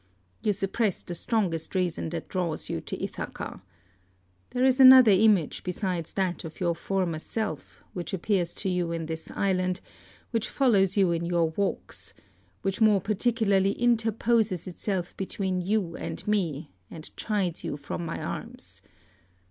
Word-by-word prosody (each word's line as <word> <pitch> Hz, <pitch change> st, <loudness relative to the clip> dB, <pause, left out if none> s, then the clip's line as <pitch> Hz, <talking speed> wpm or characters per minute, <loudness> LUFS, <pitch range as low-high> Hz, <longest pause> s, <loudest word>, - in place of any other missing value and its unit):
You 210 Hz, -, +2 dB
suppress 200 Hz, +1 st, -1 dB
the 175 Hz, -, -6 dB
strongest 175 Hz, -3 st, -1 dB
reason 180 Hz, -3 st, 0 dB
that 170 Hz, 0 st, -5 dB
draws 175 Hz, -4 st, -2 dB
you -, -, -2 dB
to -, -, -6 dB
Ithaca. -, -, -5 dB, 0.9 s
There 250 Hz, +1 st, +1 dB
is 260 Hz, 0 st, +3 dB
another 260 Hz, -3 st, +10 dB
image 200 Hz, -5 st, +3 dB
besides 180 Hz, -2 st, -3 dB
that 185 Hz, -3 st, -1 dB
of 160 Hz, -1 st, -9 dB
your 175 Hz, -2 st, +1 dB
former 170 Hz, -1 st, -1 dB
self, 220 Hz, +6 st, -5 dB
which 175 Hz, -2 st, -5 dB
appears 185 Hz, -2 st, 0 dB
to 190 Hz, -, -2 dB
you 180 Hz, -2 st, 0 dB
in 165 Hz, -1 st, -3 dB
this 160 Hz, 0 st, -5 dB
island, 185 Hz, -1 st, 0 dB, 0.5 s
which 230 Hz, -2 st, -1 dB
follows 200 Hz, -8 st, +3 dB
you 190 Hz, -3 st, +4 dB
in 170 Hz, 0 st, -1 dB
your 170 Hz, -2 st, +2 dB
walks, 200 Hz, +4 st, -3 dB, 0.5 s
which 195 Hz, +3 st, -2 dB
more 215 Hz, -2 st, +6 dB
particularly 205 Hz, -1 st, +2 dB
interposes 225 Hz, -4 st, +1 dB
itself 185 Hz, 0 st, -3 dB
between 190 Hz, -1 st, -2 dB
you 185 Hz, -2 st, 0 dB
and -, -, -6 dB
me, 165 Hz, -8 st, -1 dB, 0.2 s
and 160 Hz, -1 st, -11 dB
chides 195 Hz, -6 st, -1 dB
you -, -, -3 dB
from 160 Hz, -, -5 dB
my 165 Hz, 0 st, -4 dB
arms. -, -, -7 dB
190 Hz, 150 wpm, -27 LUFS, 170-215 Hz, 0.9 s, another